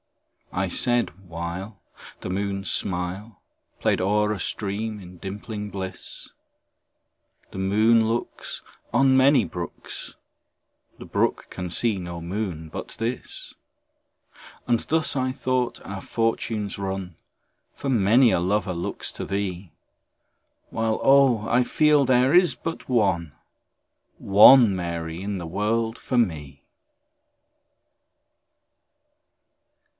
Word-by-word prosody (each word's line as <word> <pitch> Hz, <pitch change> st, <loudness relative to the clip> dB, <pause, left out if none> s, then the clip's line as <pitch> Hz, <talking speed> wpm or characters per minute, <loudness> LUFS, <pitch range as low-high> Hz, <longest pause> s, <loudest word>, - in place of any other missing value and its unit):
I 95 Hz, +1 st, 0 dB
said 120 Hz, +6 st, +1 dB, 0.2 s
(while 85 Hz, +5 st, -6 dB, 0.4 s
The -, -, -5 dB
moon's 100 Hz, +1 st, -2 dB
smile 95 Hz, +3 st, -2 dB, 0.4 s
Played -, -, +1 dB
o'er 105 Hz, +2 st, +2 dB
a 100 Hz, -, -5 dB
stream, 105 Hz, +2 st, -3 dB
in 90 Hz, -1 st, -12 dB
dimpling 105 Hz, +3 st, -6 dB
bliss,) 95 Hz, -2 st, -6 dB, 1.2 s
"The -, -, -7 dB
moon 110 Hz, +4 st, +3 dB
looks 115 Hz, +1 st, -4 dB, 0.3 s
"On 130 Hz, +2 st, +4 dB
many 135 Hz, +2 st, +5 dB
brooks, 85 Hz, -2 st, -6 dB, 0.8 s
"The -, -, -10 dB
brook -, -, 0 dB
can 90 Hz, 0 st, -5 dB
see 105 Hz, +3 st, 0 dB
no 85 Hz, -1 st, -6 dB
moon 85 Hz, -2 st, -4 dB
but -, -, -7 dB
this;" 115 Hz, +2 st, -4 dB, 1.1 s
And 120 Hz, -1 st, +3 dB
thus, 160 Hz, -1 st, -1 dB
I 130 Hz, -1 st, 0 dB
thought, 130 Hz, -1 st, -1 dB
our 100 Hz, -1 st, -6 dB
fortunes 110 Hz, -3 st, -2 dB
run, 95 Hz, -3 st, -4 dB, 0.6 s
For -, -, -6 dB
many 120 Hz, 0 st, +4 dB
a -, -, +2 dB
lover 95 Hz, +1 st, 0 dB
looks 85 Hz, 0 st, -3 dB
to -, -, -6 dB
thee, 95 Hz, -3 st, -3 dB, 1.0 s
While 110 Hz, -1 st, 0 dB
oh! 135 Hz, -5 st, +5 dB
I 125 Hz, +2 st, +3 dB
feel 150 Hz, +2 st, +3 dB
there 130 Hz, +1 st, +3 dB
is 180 Hz, 0 st, +5 dB
but 165 Hz, -4 st, -6 dB
one, 95 Hz, -, +1 dB, 0.8 s
One 105 Hz, +2 st, +7 dB
Mary 85 Hz, -1 st, -4 dB
in 100 Hz, 0 st, -3 dB
the 85 Hz, -2 st, -6 dB
world 110 Hz, +6 st, -1 dB
for 125 Hz, -, -3 dB
me. 75 Hz, -, -1 dB
105 Hz, 110 wpm, -24 LUFS, 90-120 Hz, 1.2 s, One